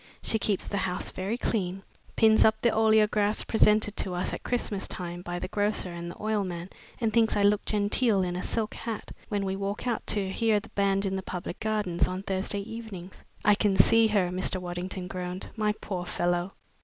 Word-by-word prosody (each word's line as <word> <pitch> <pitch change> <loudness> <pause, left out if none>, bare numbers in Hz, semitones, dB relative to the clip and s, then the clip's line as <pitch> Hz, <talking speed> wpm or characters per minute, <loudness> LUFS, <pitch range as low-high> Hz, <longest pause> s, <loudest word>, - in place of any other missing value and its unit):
She 220 - +2
keeps 200 -2 0
the 200 - -2
house 180 -2 -2
very 195 +5 -3
clean, 195 -5 -2 0.3
pins 220 -1 +6
up 220 0 +4
the 235 - +5
oleographs 215 -1 +3
presented 210 -1 +3
to 185 -2 -1
us 175 - -2
at - - -4
Christmas 215 -5 -1
time 175 -1 -4
by 175 0 -4
the 185 - -4
grocer 205 -2 -1
and 170 0 -6
the - - -9
oil 215 -1 0
man, 175 0 -5 0.3
and 225 -3 0
thinks 225 -1 +3
I 205 - +2
look 205 0 +4
genteel 205 0 +2
in 180 -1 -2
a 180 - -2
silk 220 +2 -2
hat 225 -2 -5 0.2
when 205 -2 -1
we 190 0 -1
walk 200 +3 -3
out 240 -2 -2
to 195 -3 0
hear 220 0 +2
the - - -14
band 195 0 +1
in 195 0 -1
the - - -3
public 180 -2 -6
gardens 210 -5 0
on 185 +1 -4
Thursday 195 +1 -1
evenings." 205 -4 -8 0.2
"I 210 - +7
can 205 -1 +2
see 225 +3 +6
her!" 200 -4 +2
Mr. 185 +1 0
Waddington 180 +1 -5
groaned. 180 0 -4
"My 215 -1 +1
poor 185 -4 -5
fellow!" 175 +2 -1
200 Hz, 205 wpm, -28 LUFS, 185-215 Hz, 0.3 s, I